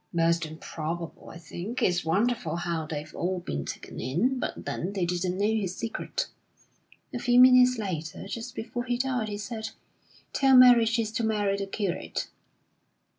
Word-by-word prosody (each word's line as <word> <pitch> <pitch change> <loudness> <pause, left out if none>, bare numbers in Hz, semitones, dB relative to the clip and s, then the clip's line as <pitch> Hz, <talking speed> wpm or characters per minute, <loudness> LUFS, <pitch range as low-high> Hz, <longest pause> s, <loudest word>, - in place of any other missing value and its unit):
(Most 170 0 +2
improbable, 160 +1 -6
I - - -10
think. 175 +8 -5
It's 175 -1 +2
wonderful 230 +7 0
how 170 -2 -2
they've 155 -1 -6
all 185 +1 -1
been 70 - -4
taken - - -7
in; 185 - 0
but - - -4
then 185 +4 -3
they 190 -3 0
didn't 180 +1 -1
know 200 - +1
his 210 -4 0
secret!) 230 +2 -3 0.9
A 245 - -2
few 245 0 +4
minutes 250 0 +7
later, 180 -4 -4
just 230 +3 -6
before 240 +2 -4
he 245 -1 0
died, 250 -4 -1
he 205 - -4
said: 220 +1 -5 0.6
'Tell 270 -2 +5
Mary 245 -2 +8
she's 225 -1 0
to 230 +1 -2
marry 210 -3 +1
the 200 0 -3
curate.' 195 -3 -3
200 Hz, 165 wpm, -27 LUFS, 170-235 Hz, 0.9 s, Mary